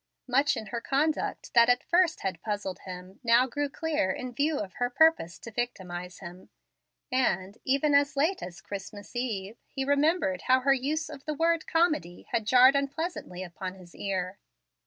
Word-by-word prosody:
Much 275 +3 +3
in 220 - -5
her 235 +1 -4
conduct 295 +5 -1
that 235 0 +6
at 245 0 +3
first 345 -1 +2
had 185 -3 -3
puzzled 205 -4 -3
him 185 +1 -9
now 235 +1 +5
grew 290 +3 -2
clear 305 -9 -1
in 250 +6 -4
view 295 +3 +1
of 195 -6 -5
her 245 - +2
purpose 250 - +3
to 230 - -10
victimize 180 -7 -4
him, 180 0 -10 0.6
and, 200 -6 0
even 280 +2 +2
as 285 0 +3
late 345 +7 +2
as 180 +1 -8
Christmas 205 +2 -8
eve, 225 -4 -3
he 270 -1 -4
remembered 285 - +2
how 255 0 +5
her 275 +1 +4
use 300 +4 -1
of 290 -3 -10
the 305 -1 -2
word 330 +1 +1
"comedy" 305 - +1
had 220 -2 0
jarred 255 +3 +7
unpleasantly 280 - -3
upon 185 +1 -6
his 180 -2 -15
ear. 190 -1 -3
245 Hz, 175 wpm, -28 LUFS, 190-285 Hz, 0.6 s, jarred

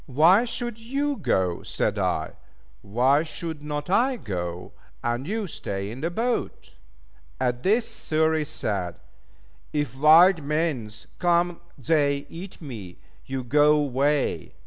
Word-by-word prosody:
"Why 165 - +5
should 235 -1 -4
you 280 +5 -1
go?" 90 - 0
said - - -1
I; - - 0 0.5
"Why 125 +8 +3
should 160 -1 -5
not 150 0 -4
I 245 +8 +2
go, 90 - -5 0.3
and 120 +4 -2
you 215 +2 -2
stay 100 - -5
in 125 +4 -8
the 165 - 0
boat?" 230 +7 -3 0.6
At 125 -1 0
this 220 - +2 0.2
Xury 160 0 +2
said, 100 - -3 0.7
"if 145 -3 -2
wild 160 +5 +7
mans 140 -8 -2
come 175 0 +2 0.2
they 140 0 +1
eat 180 +3 -9
me, 105 - -8 0.3
you 130 -1 -3
go 150 +4 +4
way." 140 +1 0
150 Hz, 125 wpm, -25 LUFS, 125-175 Hz, 0.7 s, wild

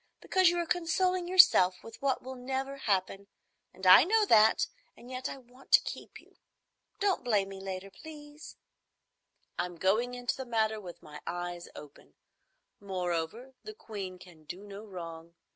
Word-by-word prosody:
Because 370 -2 +3
you 350 - -1
are 345 - 0
consoling 355 +1 0
yourself 345 - +6
with 225 0 -12
what 275 -1 0
will 260 +1 -7
never 265 +2 -4
happen, 200 -4 -1 0.4
and 190 - -10
I 185 +6 +9
know 430 +5 +3
that, 220 - +5 0.3
and 245 - -13
yet 255 0 -4
I - - -7
want 250 +1 -19
to - - +10
keep - - -8
you. - - -23 0.6
Don't 400 -6 +1
blame 205 -5 +1
me 195 0 -9
later, 195 0 -6
please." 300 +1 -12 1.0
"I'm 175 0 -2
going 220 +8 +1
into 245 0 -2
the 265 - -5
matter 220 -3 0
with 175 -3 -11
my 150 -1 -11
eyes 175 0 -5
open. 145 -1 -14 0.6
Moreover 185 +5 -4
the 430 0 -9
Queen 195 - -7
can 175 -3 -16
do 180 +6 -9
no 205 0 -10
wrong. 170 -4 -9
220 Hz, 160 wpm, -30 LUFS, 185-270 Hz, 1.0 s, to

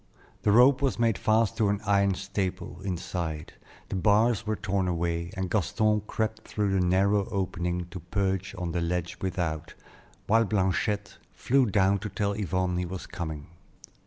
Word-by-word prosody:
The 105 - +3
rope 125 +5 +6
was 135 -2 +1
made 115 -3 +1
fast 110 0 +2
to 110 -3 +2
an 100 0 0
iron 100 -1 +3
staple 95 -2 -4
inside, 85 -4 -4 0.4
the - - -3
bars 110 +3 +3
were 110 - +1
torn 100 -2 -1
away, 85 -1 -1
and 95 0 -1
Gaston 105 +3 +1
crept 110 0 -2
through 105 -2 -1
the 95 -1 +2
narrow 95 +3 +2
opening 90 -2 -2
to 90 - -6
perch 95 +2 -2
on 90 -2 -3
the 85 0 -1
ledge 85 0 -2
without, 85 -5 -3 0.5
while 115 +2 +4
Blanchette 105 0 -1 0.2
flew 130 0 +2
down 100 -1 +3
to 105 - -5
tell 100 -1 -1
Yvonne 95 -2 -1
he 90 - -1
was 95 +1 -6
coming. 80 -4 -5
95 Hz, 160 wpm, -28 LUFS, 90-105 Hz, 0.5 s, rope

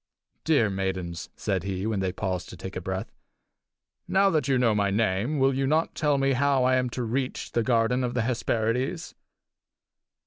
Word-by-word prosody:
"Dear 130 -10 +3
maidens," 95 -3 -3
said 95 -2 -1
he, 95 +1 -3
when 110 -2 -1
they 95 -1 0
paused 90 -1 -3
to 90 - -10
take 95 +3 -7
breath, 95 +2 -4 1.0
"now 195 0 +3
that 155 -4 +1
you 135 -2 +3
know 120 -3 +3
my 100 -1 +1
name, 105 +6 0
will 135 0 +3
you 135 +1 0
not 155 +3 +1
tell 150 -2 +1
me 135 0 +2
how 140 0 +2
I 130 +1 +3
am 125 -1 0
to 125 - -1
reach 125 +3 -3
the 120 - +1
garden 120 +1 +2
of 125 0 -2
the 120 - +1
Hesperides?" 120 +5 -1
120 Hz, 180 wpm, -26 LUFS, 95-135 Hz, 1.0 s, Dear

